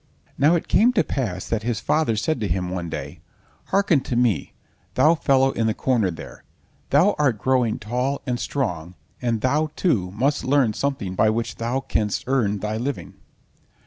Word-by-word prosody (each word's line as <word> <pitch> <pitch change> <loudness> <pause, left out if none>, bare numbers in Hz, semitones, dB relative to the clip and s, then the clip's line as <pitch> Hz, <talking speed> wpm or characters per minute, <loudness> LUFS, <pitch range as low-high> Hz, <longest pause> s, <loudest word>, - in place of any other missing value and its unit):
Now 150 +5 +4
it 170 - -2
came 240 +3 +4
to 215 - +3
pass 95 -9 -3
that 115 -2 -1
his 115 -2 -2
father 150 -1 +1
said 130 +6 -1
to 105 - -1
him 90 0 -2
one 90 -2 -4
day: - - -6 0.5
"Hearken 190 -6 +2
to 125 - -4
me, 120 -8 +1 0.4
thou 150 +6 +5
fellow 135 -4 +2
in 115 -3 -1
the 110 - 0
corner 120 -7 +1
there, 85 - -9 0.5
thou 170 +9 +4
art 135 -7 +2
growing 125 -1 +1
tall 125 +6 -2
and 125 -3 -2
strong, 90 - -3 0.3
and 115 -3 -1
thou, 150 +5 +1
too, 110 - +1
must 140 +7 0
learn 130 -5 +2
something 130 -8 -2
by 110 +3 +3
which 115 +1 -2
thou 120 +4 -1
canst 105 -6 -1
earn 120 -6 +1
thy 105 +1 -2
living. 135 +4 -4
120 Hz, 175 wpm, -23 LUFS, 105-140 Hz, 0.5 s, thou